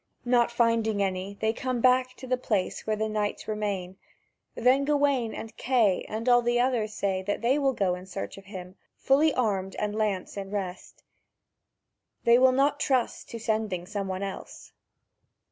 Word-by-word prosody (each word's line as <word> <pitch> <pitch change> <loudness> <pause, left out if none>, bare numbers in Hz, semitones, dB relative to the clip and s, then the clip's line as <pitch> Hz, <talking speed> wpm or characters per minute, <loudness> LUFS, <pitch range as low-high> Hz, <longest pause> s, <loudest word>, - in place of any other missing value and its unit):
Not 240 -1 +3
finding 230 -3 +2
any, 190 +1 -3
they 220 0 +2
come 255 0 -2
back 255 +1 +3
to 260 - -10
the 255 0 +1
place 215 -7 -2
where 215 - +1
the 220 +1 -1
knights 210 -1 -2
remain; 200 -4 -3 0.6
then 260 +3 +3
Gawain 280 -5 +1
and 225 - -8
Kay 230 -8 +2
and 220 +3 -4
all 245 -1 +6
the 240 0 +1
others 245 -4 +1
say 190 -2 -1
that 205 +4 -3
they 260 +5 +3
will 270 -2 +2
go 195 -6 +1
in 180 +1 -7
search 195 +1 -6
of 195 - -17
him, 185 -1 -9 0.2
fully 295 +4 +3
armed 195 -7 -1
and 210 0 -2
lance 205 -3 -2
in 195 -1 -5
rest; 195 -3 -6 1.2
they 235 +1 +6
will 260 0 +6
not 275 +3 +2
trust 260 -3 0
to 230 - -6
sending 215 -5 -1
some 200 0 -4
one 190 +1 -3
else. 195 -1 -8
220 Hz, 175 wpm, -27 LUFS, 195-250 Hz, 1.2 s, all